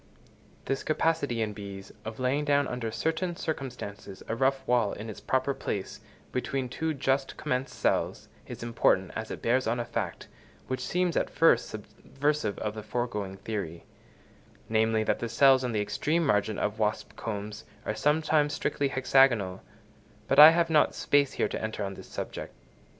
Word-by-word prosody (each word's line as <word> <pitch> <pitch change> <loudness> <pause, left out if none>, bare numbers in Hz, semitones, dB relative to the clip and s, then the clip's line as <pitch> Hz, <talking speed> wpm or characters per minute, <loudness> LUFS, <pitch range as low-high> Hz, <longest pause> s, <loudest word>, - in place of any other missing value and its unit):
This 135 - -1
capacity 150 -7 0
in 105 -1 -3
bees 100 -2 -9
of 110 +1 -6
laying 130 +3 +1
down 145 -1 +2
under 125 -2 -3
certain 160 +8 -1
circumstances 125 - -6
a 115 - -1
rough 135 +2 +1
wall 120 -4 +2
in 110 +1 -6
its - - -10
proper 130 +1 0
place 100 -6 -4 0.3
between 130 0 -2
two 160 +4 -2
just 135 0 0
commenced 125 +1 -2
cells, - - 0 0.2
is - - -7
important, 115 -5 +2
as 110 0 -4
it - - -7
bears 125 +2 +2
on 120 +2 0
a 120 - -2
fact, 120 - -4 0.4
which 130 -1 -3
seems 180 +5 0
at - - +1
first 165 - +3
subversive 135 +3 -2
of 105 -1 -3
the 110 - -6
foregoing 105 -5 -3
theory; 95 -6 -5 0.8
namely, 110 0 +2
that - - 0
the 120 - -3
cells 130 +2 +5
on 125 - -1
the 105 -2 0
extreme 150 +11 0
margin 105 -4 +1
of 105 +1 -2
wasp 105 -1 -1
combs 105 -1 -5 0.2
are - - -1
sometimes 150 +4 +2
strictly 145 - 0
hexagonal; 130 -8 +3 0.7
but - - +3
I 150 +1 +13
have 165 0 +2
not 155 -2 +4
space 140 -1 +2
here - - +1
to - - -4
enter 110 -1 -3
on 100 0 -3
this - - -11
subject. - - -6
125 Hz, 170 wpm, -28 LUFS, 105-140 Hz, 0.8 s, I